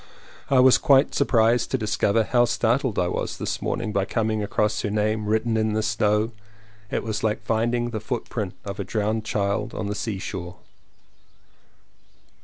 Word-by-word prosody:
I 135 - +4
was 130 0 +6
quite 135 0 +4
surprised 120 -3 +2
to 130 - 0
discover 110 -1 +1
how 120 +2 +3
startled 120 0 0
I 90 - +2
was - - -3
this - - -3
morning 115 -2 -2
by 100 -1 +1
coming 110 0 -1
across 105 +1 0
her - - -2
name 105 0 0
written 110 +2 +1
in 110 -1 +1
the 110 0 0
snow; 105 0 +1 0.6
it - - -2
was 110 -1 -3
like 105 -1 0
find 115 +2 0
ing 120 0 -1
the 110 - -3
foot 120 +2 -4
print 105 -6 -4
of 100 +1 -6
a - - -1
drowned 110 +2 -1
child 105 +1 -1
on - - -3
the 100 - -2
sea 105 -1 -3
shore. 90 -1 -6
110 Hz, 180 wpm, -24 LUFS, 105-115 Hz, 0.6 s, was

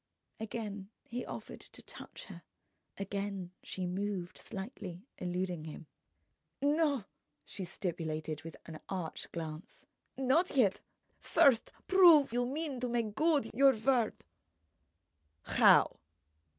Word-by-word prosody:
Again 210 -3 -5
he 245 +1 -5
offered - - -7
to - - -12
touch - - -10
her, - - -10 0.6
again 195 -2 -4
she 185 - -4
moved 185 0 -3
slightly, 190 -2 -7
eluding 180 -2 -2
him. 160 +1 -8 0.7
"No," 290 -3 +2 0.4
she 190 - -6
stipulated 160 -4 -3
with 165 0 -9
an 160 -2 -8
arch 180 -4 -4
glance—"not 250 - -2
yet! 205 -7 +4 0.4
First 260 -5 +4 0.2
prove 340 -9 +7
you 245 0 +1
mean 285 -1 -3
to 250 0 -2
make 230 -3 -1
good 300 -3 +2
your 270 +2 +6
word." 235 0 +2 1.3
"How?" - - +5
205 Hz, 110 wpm, -33 LUFS, 180-265 Hz, 1.3 s, prove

